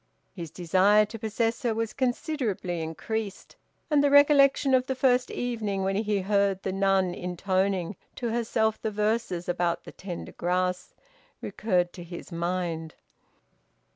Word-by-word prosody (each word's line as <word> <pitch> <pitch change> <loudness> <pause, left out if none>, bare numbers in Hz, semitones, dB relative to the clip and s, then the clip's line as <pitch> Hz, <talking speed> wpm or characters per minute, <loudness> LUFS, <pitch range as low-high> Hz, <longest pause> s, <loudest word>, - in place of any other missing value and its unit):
His 170 -4 -7
desire 190 +6 +3
to 220 +2 -9
possess 225 +1 -1
her 235 -3 0
was 225 -1 -2
considerably 245 - -2
increased, 200 +6 -5 0.4
and 290 -1 +4
the 285 - +4
recollection 280 -1 +5
of 255 0 +3
the 265 - -1
first 250 -1 +2
evening 215 -5 -2
when 195 0 0
he 210 -1 0
heard 200 -1 +1
the 190 - -1
nun 195 -1 +2
intoning 185 +1 -1 0.2
to 240 - -3
herself 220 -1 0
the 220 - -1
verses 210 -4 -1
about 175 -1 0
the - - -10
tender 180 -3 -7
grass, 180 +1 -1 0.4
recurred 180 -5 -1
to 175 - -9
his 170 +2 -9
mind. 170 -2 -3
200 Hz, 140 wpm, -27 LUFS, 180-230 Hz, 0.4 s, recollection